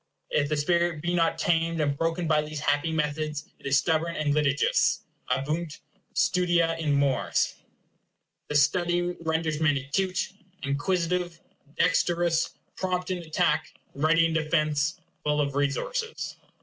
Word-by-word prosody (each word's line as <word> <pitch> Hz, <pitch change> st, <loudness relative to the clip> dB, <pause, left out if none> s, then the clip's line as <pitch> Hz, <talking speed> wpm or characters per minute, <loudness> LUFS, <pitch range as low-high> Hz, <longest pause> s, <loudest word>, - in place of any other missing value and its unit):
If 145 Hz, -1 st, +1 dB
the 150 Hz, -, 0 dB
spirit 170 Hz, +1 st, +1 dB
be 175 Hz, 0 st, 0 dB
not 165 Hz, -2 st, +2 dB
tamed 165 Hz, -1 st, +1 dB
and 145 Hz, -2 st, +1 dB
broken 165 Hz, +3 st, -1 dB
by 155 Hz, -1 st, +3 dB
these 150 Hz, 0 st, -5 dB
happy 145 Hz, +3 st, +1 dB
methods, 150 Hz, -1 st, -2 dB
it -, -, -7 dB
is 135 Hz, 0 st, +4 dB
stubborn 160 Hz, +2 st, +1 dB
and 145 Hz, -1 st, +1 dB
litigious. 145 Hz, -2 st, +2 dB, 0.3 s
Abeunt 150 Hz, +5 st, -1 dB, 0.4 s
studia 175 Hz, -2 st, +2 dB
in 155 Hz, -3 st, +1 dB
mores. 140 Hz, -2 st, +1 dB, 0.9 s
This 145 Hz, -1 st, +4 dB
study 175 Hz, +3 st, +1 dB, 0.2 s
readers 160 Hz, -1 st, -1 dB
men 150 Hz, -3 st, +3 dB
acute, 185 Hz, +9 st, -1 dB, 0.3 s
inquisitive, 170 Hz, +4 st, -1 dB, 0.4 s
dexterous, 170 Hz, -1 st, +2 dB, 0.3 s
prompt 185 Hz, -1 st, -1 dB
in 180 Hz, -, -1 dB
attack, 160 Hz, -2 st, 0 dB, 0.2 s
ready 160 Hz, +3 st, +3 dB
in 165 Hz, -, 0 dB
defence, 155 Hz, -1 st, +1 dB, 0.2 s
full 150 Hz, 0 st, +1 dB
of 140 Hz, -1 st, 0 dB
resources. 145 Hz, -, -2 dB
160 Hz, 135 wpm, -27 LUFS, 145-170 Hz, 0.9 s, is